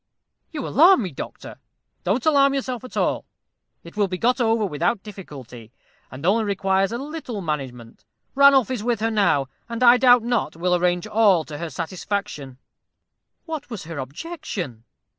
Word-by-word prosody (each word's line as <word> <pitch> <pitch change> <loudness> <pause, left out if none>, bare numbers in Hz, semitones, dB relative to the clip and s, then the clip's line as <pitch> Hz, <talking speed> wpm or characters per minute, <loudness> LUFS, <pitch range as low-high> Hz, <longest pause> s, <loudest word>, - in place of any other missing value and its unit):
"You 295 -5 -4
alarm 340 - +5
me, 185 - -4
doctor." 135 - -9 0.5
"Don't 215 +7 0
alarm 280 -3 +4
yourself 255 -3 -3
at 255 - -9
all. - - 0 0.6
It 170 - -13
will 205 -1 +2
be 185 -1 -4
got 250 +5 +1
over 225 -2 +2
without 185 +5 -1
difficulty, 135 - -11 0.4
and 135 +4 -8
only 215 +5 +3
requires 195 -1 +1
a 235 - -2
little 280 -5 -6
management. 135 -9 -5 0.3
Ranulph 275 -3 +5
is 240 -5 -3
with 240 -1 0
her 225 +1 0
now, 175 -11 +2 0.2
and 235 +1 -2
I 240 0 +8
doubt 245 -2 +5
not 235 -10 -1
will 180 +2 0
arrange 175 0 +1
all 205 -7 +3
to 150 -1 -8
her 170 -1 -4
satisfaction." 165 -4 -5 0.9
"What 315 -5 -6
was 225 -5 -6
her 160 -2 -7
objection?" 140 - -6
205 Hz, 160 wpm, -23 LUFS, 165-245 Hz, 0.9 s, I